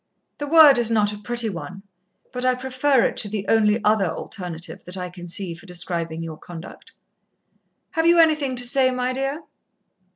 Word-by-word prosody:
The 290 - -4
word 300 -4 +7
is 235 -2 +2
not 210 -2 +1
a - - -7
pretty 240 +2 0
one, 190 0 -7 0.5
but 250 -1 -4
I 255 0 +2
prefer 260 +1 +1
it - - -1
to 205 - -1
the 205 -1 -4
only 220 -1 +3
other 210 -3 +3
alternative 175 -1 -6
that 180 +2 -8
I 180 -1 -5
can 175 -1 -10
see, 175 0 -1
for 175 +4 -14
describing 170 -2 -4
your 160 -2 -7
conduct." 170 +1 -11 1.0
"Have 325 -1 +1
you 340 0 +5
anything 305 -5 +3
to 245 0 +1
say, 255 +1 +3
my 255 0 -2
dear?" 270 +4 -3
220 Hz, 185 wpm, -22 LUFS, 180-260 Hz, 1.0 s, word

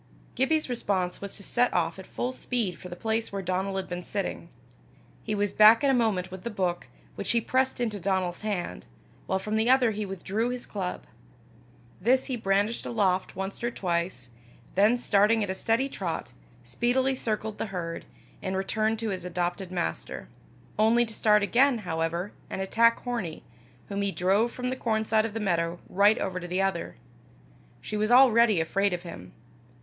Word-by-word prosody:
Gibbie's 305 +4 +1
response 195 -7 -1
was 200 -1 -6
to 200 - -10
set 245 +4 +2
off 165 +1 0
at 190 - -10
full 250 - -3
speed 230 -9 -2
for 180 - -9
the 175 - -6
place 220 +3 -1
where 195 -1 -4
Donal 185 +2 -1
had 190 - -3
been 175 0 -4
sitting. 200 +3 -4 0.7
He 215 - -2
was 205 -1 0
back 215 +4 +7
in 275 - +4
a - - +3
moment 210 -7 +1
with 185 -1 -8
the 235 - -3
book, 185 -5 -2 0.3
which - - -5
he 235 - +4
pressed 260 +3 0
into 220 -4 -1
Donal's 185 -1 -1
hand, 200 - -3 0.4
while 190 - +1
from 210 +3 -2
the 220 +2 +2
other 255 -3 +5
he 210 -1 -3
withdrew 195 +5 -2
his 250 0 -4
club. 185 -3 -4 1.0
This 255 +6 +3
he 260 - -2
brandished 205 +1 0
aloft 190 -5 0
once 195 +4 -5
or 240 - +1
twice, 170 - -3 0.4
then 210 +5 +4
starting 215 -1 +3
at 195 - -2
a - - -1
steady 230 +7 +1
trot, 170 - -4 0.3
speedily 245 - +1
circled 215 -3 -3
the - - -2
herd, 170 -4 -5 0.4
and 190 -1 -2
returned 215 +3 0
to 225 - -1
his 185 -3 -3
adopted 180 +1 -3
master 80 - -3 0.5
only 230 +2 +4
to 220 - -9
start 210 -1 +4
again, 255 +5 +4
however, 170 0 -2 0.2
and - - -4
attack 230 +4 +3
Hornie, 230 -10 -4 0.5
whom 200 0 -2
he 200 0 0
drove 195 +6 +2
from 250 +1 -3
the - - -1
corn 220 -3 0
side 220 0 +2
of 220 - -11
the - - -1
meadow 170 -4 0
right 205 +3 +4
over 185 -1 -2
to 175 - -7
the 180 +2 -1
other: 195 -3 -1 0.9
she 215 - -5
was 215 +1 0
already 235 -5 +6
afraid 195 +4 +1
of 175 0 -4
him. 90 - -9
205 Hz, 185 wpm, -27 LUFS, 185-230 Hz, 1.0 s, back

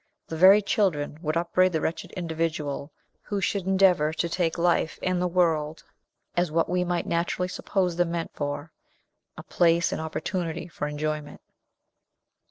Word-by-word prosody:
The 160 - -6
very 190 +5 +7
children 160 -8 0
would 155 -1 -1
upbraid 180 +2 +2
the 160 - +1
wretched 170 +2 -3
individual 160 -4 -3 0.3
who 205 - -3
should 195 0 -1
endeavor 190 -5 +4
to 170 - -1
take 170 -1 -1
life 170 -2 +1
and 185 -1 0
the 180 - +2
world 165 -3 +1 0.5
as 175 +1 +2
w 155 - -10
what 165 - +3
we 180 0 +1
might 175 -1 -1
naturally 175 +2 -1
suppose 185 -1 -1
them 175 -1 +2
meant 170 -1 -3
for 145 +2 -4 0.7
a - - -8
place 170 0 +2
and - - -2
opportunity 165 +1 -3
for 150 -3 -4
enjoyment. 150 0 -4
170 Hz, 160 wpm, -26 LUFS, 155-180 Hz, 0.7 s, very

